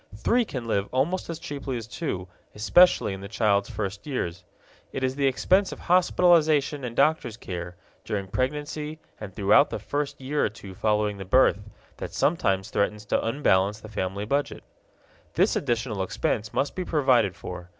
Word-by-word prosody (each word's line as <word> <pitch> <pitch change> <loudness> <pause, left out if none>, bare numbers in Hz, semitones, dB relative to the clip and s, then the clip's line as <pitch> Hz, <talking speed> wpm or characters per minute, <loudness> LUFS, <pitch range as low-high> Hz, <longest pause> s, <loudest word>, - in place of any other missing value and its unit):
Three 235 - +2
can 130 - -5
live 100 -3 -1
almost 155 +10 0
as 165 - -3
cheaply 140 -4 -5
as 115 - -6
two, 110 - -4 0.3
especially 115 - +4
in 95 - -7
the 100 - -7
child's 100 -1 +1
first 100 -1 -5
years. 95 - -3 0.5
It 130 - -4
is 130 0 +1
the 140 -1 +2
expense 185 +9 +2
of - - -7
hospitalization 165 -5 +3
and 120 -2 -5
doctor's 140 -5 +2
care, 90 -4 -6 0.3
during 100 -3 -3
pregnancy 150 +6 -3 0.2
and 105 -2 -7
throughout 105 +8 +4
the - - -3
first 145 0 -3
year 140 +3 -1
or - - +2
two 100 -3 -11
following 105 +1 0
the 95 - -6
birth, 100 -1 +4 0.4
that - - -6
sometimes 95 - +1
threatens 105 +1 -1
to - - 0
unbalance 105 -5 +2
the 110 - -11
family 100 0 -3
budget. 140 +5 -1 0.7
This - - +3
additional 115 -4 -1
expense 105 +2 -2
must 140 - -1
be 185 - -3
provided 130 - +2
for. 90 -1 -8
115 Hz, 170 wpm, -26 LUFS, 100-145 Hz, 0.7 s, especially